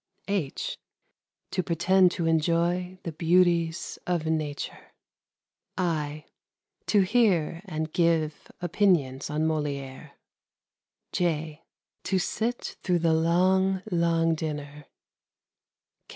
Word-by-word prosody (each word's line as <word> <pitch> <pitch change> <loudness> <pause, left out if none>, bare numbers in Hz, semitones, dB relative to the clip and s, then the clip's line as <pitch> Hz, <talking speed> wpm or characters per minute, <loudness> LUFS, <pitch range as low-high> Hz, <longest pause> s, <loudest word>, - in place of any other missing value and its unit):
(h) 190 -9 -2 0.7
To - - 0
pretend 180 +2 +3
to 170 - -2
enjoy 170 +3 +1
the 165 - -4
beauties 170 0 +1
of 175 -3 0
nature. 155 -3 -3 0.8
(i) 155 -4 -2 0.6
To 205 - +4
hear 185 -6 +2
and 155 -4 -4
give 165 -3 +1
opinions 170 -8 +1
on 150 +1 -1
Molière. 145 -4 -3 1.0
(j) 160 -3 -1 0.4
To 190 - +1
sit 225 +6 -2
through 180 -2 +1
the 165 -1 +2
long, 185 +4 +2
long 165 -1 +2
dinner. 150 -2 -5
165 Hz, 95 wpm, -27 LUFS, 155-180 Hz, 1.0 s, To